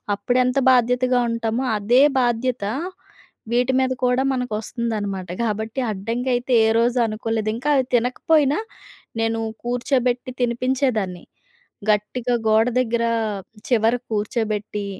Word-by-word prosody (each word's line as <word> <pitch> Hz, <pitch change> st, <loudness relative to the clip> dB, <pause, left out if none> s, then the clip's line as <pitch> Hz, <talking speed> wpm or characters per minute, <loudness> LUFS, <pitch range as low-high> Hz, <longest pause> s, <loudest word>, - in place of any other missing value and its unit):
అప్పుడెంత 250 Hz, +5 st, +1 dB
బాధ్యతగా 250 Hz, +1 st, +3 dB
ఉంటామో, 230 Hz, +2 st, -1 dB
అదే 235 Hz, +6 st, +3 dB, 0.2 s
బాధ్యత 240 Hz, -1 st, 0 dB, 0.9 s
వీటి 245 Hz, +2 st, +2 dB
మీద 260 Hz, 0 st, +1 dB
కూడా 250 Hz, +1 st, +2 dB
మనకొస్తుందనమాట. 215 Hz, -5 st, -3 dB
కాబట్టి 220 Hz, +2 st, -2 dB
అడ్డంకయితే 245 Hz, +5 st, -2 dB
ఏరోజు 230 Hz, +2 st, +2 dB
అనుకోలేదు. 220 Hz, 0 st, -2 dB
ఇంకా 260 Hz, +6 st, -2 dB
అది 265 Hz, -2 st, +2 dB
తినకపోయినా, 275 Hz, +4 st, +2 dB, 0.6 s
నేను 225 Hz, 0 st, 0 dB, 0.2 s
కూర్చోబెట్టి 245 Hz, 0 st, 0 dB
తినిపించేదాన్ని. 240 Hz, -6 st, 0 dB, 0.7 s
గట్టిగా 230 Hz, +4 st, +1 dB
గోడ 220 Hz, +1 st, +4 dB
దగ్గర 235 Hz, -1 st, 0 dB, 0.6 s
చివరకి 235 Hz, 0 st, +1 dB
కూర్చోబెట్టి, 210 Hz, -1 st, -2 dB
235 Hz, 95 wpm, -22 LUFS, 220-250 Hz, 0.9 s, గోడ